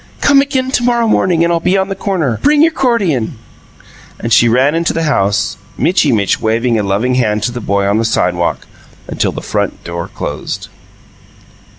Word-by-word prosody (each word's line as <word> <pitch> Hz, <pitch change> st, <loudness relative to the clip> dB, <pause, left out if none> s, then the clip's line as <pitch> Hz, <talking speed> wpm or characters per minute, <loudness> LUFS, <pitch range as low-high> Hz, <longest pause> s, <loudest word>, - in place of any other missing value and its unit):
Come 280 Hz, -1 st, +4 dB
again 265 Hz, -2 st, -1 dB
to 255 Hz, -, +1 dB
morrow 235 Hz, -1 st, +2 dB
morning 175 Hz, -5 st, +2 dB
and 170 Hz, 0 st, +1 dB
I'll 170 Hz, -, +1 dB
be 185 Hz, +3 st, +1 dB
on 190 Hz, 0 st, 0 dB
the 195 Hz, -, -3 dB
corner. 180 Hz, -, -1 dB
Bring 295 Hz, +1 st, +4 dB
your 330 Hz, -, +4 dB
'cordion!" 195 Hz, -, 0 dB, 0.8 s
And 115 Hz, -, -1 dB
she 120 Hz, -, +5 dB
ran 130 Hz, +5 st, +3 dB
into 165 Hz, +1 st, 0 dB
the 165 Hz, -, -1 dB
house, 105 Hz, -8 st, 0 dB, 0.2 s
Mitchy 165 Hz, -5 st, +2 dB
Mitch 100 Hz, -5 st, +1 dB
waving 115 Hz, +1 st, +1 dB
a -, -, +1 dB
loving 105 Hz, +6 st, 0 dB
hand 105 Hz, -4 st, 0 dB
to 120 Hz, -, 0 dB
the 120 Hz, 0 st, -6 dB
boy 100 Hz, -1 st, 0 dB
on 100 Hz, +2 st, +1 dB
the -, -, 0 dB
sidewalk 90 Hz, -6 st, 0 dB, 0.4 s
until -, -, -1 dB
the -, -, -7 dB
front -, -, -3 dB
door 85 Hz, 0 st, -5 dB
closed. -, -, -6 dB
130 Hz, 190 wpm, -14 LUFS, -, 0.8 s, she